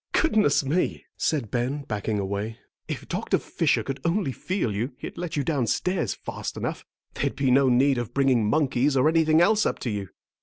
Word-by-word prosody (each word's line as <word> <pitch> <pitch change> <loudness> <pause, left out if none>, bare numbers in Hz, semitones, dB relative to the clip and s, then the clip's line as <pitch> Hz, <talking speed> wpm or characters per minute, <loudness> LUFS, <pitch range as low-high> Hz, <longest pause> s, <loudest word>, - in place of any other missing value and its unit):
"Goodness 215 - +3
me," 160 +7 -1
said 135 -9 -1
Ben, 130 +4 -1
backing 105 -3 -2
away, 100 +3 -3 0.3
"if - - -5
Doctor - - 0
Fisher - - 0
could 135 0 -4
only 170 -3 0
feel 180 - -2
you 120 +7 -2
he'd - - -7
let 175 -1 -4
you 145 - +1
downstairs 160 +6 0
fast - - -6
enough. - - -3 0.3
There'd - - -2
be 135 -2 +1
no 135 +1 +5
need 130 +1 +3
of 120 -1 -4
bringing 130 -5 +2
monkeys 135 -1 +2
or 130 - +4
anything 160 0 +4
else 215 +4 +4
up - - 0
to 120 - -3
you." 100 -3 -4
135 Hz, 185 wpm, -25 LUFS, 120-160 Hz, 0.3 s, no